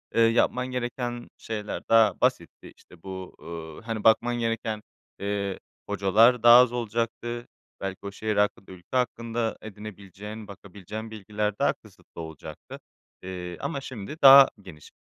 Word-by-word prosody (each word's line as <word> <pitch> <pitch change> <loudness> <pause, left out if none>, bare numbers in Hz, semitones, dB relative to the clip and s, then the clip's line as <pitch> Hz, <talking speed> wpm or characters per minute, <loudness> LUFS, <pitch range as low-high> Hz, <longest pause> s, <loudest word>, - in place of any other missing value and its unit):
eee, 115 - +4
yapman 120 +2 +3
gereken 120 -1 -4
şeyler 105 -2 -5
daha 115 -1 +4
basitti. - - -1
İşte, 85 -2 -19
bu, 95 -1 -8
uuu, 80 -2 -9
hani, 110 -2 -3
bakman 120 +2 +4
gereken, 115 -2 -2 0.4
eee, 100 -1 -2 0.3
hocalar 110 +5 +4
daha 120 0 +10
az 125 -1 +5
olacaktı. 120 0 -3 0.3
Belki 95 -1 -4
o 100 - -4
şehir 110 +1 -3
hakkında, 105 0 0
ülke 90 +7 -5
hakkında 115 -1 -1
edinebileceğin, 105 0 -9
bakabileceğin 100 +2 -9
bilgiler 105 0 -3
daha - - +3
kısıtlı - - -14
olacaktı, 80 -2 -10 0.4
eee, 90 -1 -6
ama 140 -1 -3
şimdi 130 +1 -7
daha 135 0 +10
geniş. 80 -7 -13
110 Hz, 135 wpm, -26 LUFS, 100-120 Hz, 0.4 s, daha